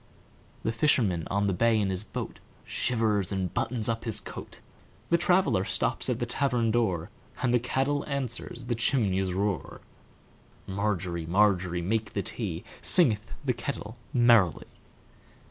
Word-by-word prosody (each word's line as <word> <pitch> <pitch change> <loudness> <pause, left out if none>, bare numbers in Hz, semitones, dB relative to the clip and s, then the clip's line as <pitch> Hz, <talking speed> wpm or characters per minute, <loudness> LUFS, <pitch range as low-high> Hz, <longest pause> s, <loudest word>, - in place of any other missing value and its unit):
The 110 - +1
fisherman 115 - +2
on 100 +1 +1
the 100 - +1
bay 115 +3 +3
in 100 -2 +1
his 95 +2 -1
boatShivers 110 -2 -2
and 95 -2 -2
buttons 115 -3 0
up 115 -1 -1
his 115 -4 -1
coat; - - -9 0.5
The 170 - +6
traveller 175 - +3
stops - - 0
at 125 - +1
the 120 - -1
tavern 125 -2 +1
door, 95 -8 0 0.3
And 120 -1 +2
the 125 - +5
kettle 135 +4 0
answers 125 -3 -4
the 120 - 0
chimney's 100 -6 +1
roar. 100 0 -2 0.9
Margery, 95 -4 -2
Margery, 90 -2 +2
make 110 +4 -1
the 100 - -1
tea, 90 -4 -4 0.2
Singeth 115 - +3
the 130 - +2
kettle 115 -4 -5 0.2
merrily. 115 - +4
110 Hz, 140 wpm, -28 LUFS, 95-120 Hz, 0.9 s, The